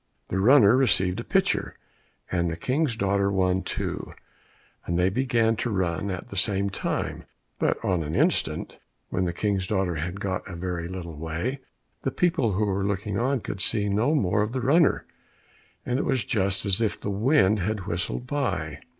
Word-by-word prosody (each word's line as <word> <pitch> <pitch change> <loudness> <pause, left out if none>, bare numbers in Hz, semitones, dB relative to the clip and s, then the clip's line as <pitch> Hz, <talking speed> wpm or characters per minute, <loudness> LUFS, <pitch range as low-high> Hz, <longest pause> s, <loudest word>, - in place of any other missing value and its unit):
The 95 - -1
runner 115 0 +6
received 95 -7 +2
a - - -4
pitcher, 195 +5 0 0.5
and 85 -2 +1
the 85 - -3
King's 130 - 0
daughter 100 -1 +1
one 95 -1 +1
too, - - -4 0.7
and 85 - 0
they 90 +1 +3
began 115 0 +1
to 120 - -1
run 95 -2 -1
at 95 -2 -5
the - - -8
same 100 +1 +1
time, - - -3 0.3
but - - +1
in 90 -3 +1
an 75 0 -3
instant, - - 0 0.3
when 90 - 0
the 85 - 0
King's 95 +1 -1
daughter 95 -5 0
had 90 +5 -4
got 95 -2 -3
a 95 - -6
very 85 -1 -3
little 85 -4 -7
way, 80 - -3 0.4
the - - 0
people 130 - +1
who 105 +3 +1
were 100 -1 -1
looking 100 +1 -1
on 130 +1 +1
could 100 - -5
see 105 -2 +2
no 110 +10 +2
more 105 -6 +2
of 105 +3 -1
the 130 - -1
runner, 150 +5 +3 0.8
and 125 +2 0
it - - 0
was 130 -7 0
just 100 -2 0
as 100 +2 +3
if 110 - 0
the 100 - -3
wind 105 -1 +3
had 100 +1 -2
whistled 90 +6 -2
by. 100 - -2
100 Hz, 185 wpm, -26 LUFS, 90-115 Hz, 0.8 s, runner